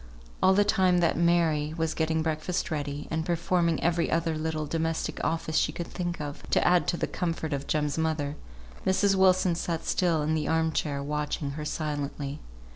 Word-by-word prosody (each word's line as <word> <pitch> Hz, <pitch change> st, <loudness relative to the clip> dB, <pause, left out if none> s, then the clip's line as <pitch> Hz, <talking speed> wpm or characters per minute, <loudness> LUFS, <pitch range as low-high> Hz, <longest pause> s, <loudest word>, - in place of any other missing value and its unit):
All 190 Hz, 0 st, +5 dB
the 205 Hz, -, +5 dB
time 190 Hz, -4 st, +3 dB
that 170 Hz, -, +2 dB
Mary 160 Hz, -3 st, +2 dB
was 160 Hz, -1 st, 0 dB
getting 160 Hz, 0 st, 0 dB
breakfast 160 Hz, +3 st, -2 dB
ready, 145 Hz, -1 st, -3 dB
and 160 Hz, 0 st, 0 dB
performing 170 Hz, -1 st, +1 dB
every 170 Hz, 0 st, +1 dB
other 165 Hz, -1 st, 0 dB
little 155 Hz, 0 st, -2 dB
domestic 160 Hz, +1 st, -2 dB
office 160 Hz, -1 st, -1 dB
she 150 Hz, -, +2 dB
could 170 Hz, +2 st, -5 dB
think 175 Hz, 0 st, -4 dB
of, 145 Hz, -1 st, -5 dB
to -, -, +3 dB
add 180 Hz, -1 st, +4 dB
to 170 Hz, -, +1 dB
the -, -, 0 dB
comfort 165 Hz, -3 st, -3 dB
of 140 Hz, 0 st, -3 dB
Jem's 150 Hz, 0 st, 0 dB
mother, 155 Hz, -2 st, -1 dB, 0.5 s
Mrs. 195 Hz, +1 st, +3 dB
Wilson 185 Hz, -1 st, +4 dB
sat 165 Hz, -1 st, -3 dB
still 170 Hz, -4 st, +1 dB
in 155 Hz, +1 st, 0 dB
the 155 Hz, -1 st, -1 dB
arm 160 Hz, 0 st, +2 dB
chair, 145 Hz, -2 st, -2 dB
watching 150 Hz, 0 st, -2 dB
her 150 Hz, +2 st, -5 dB
silently. 145 Hz, -2 st, -3 dB
160 Hz, 185 wpm, -28 LUFS, 150-170 Hz, 0.5 s, All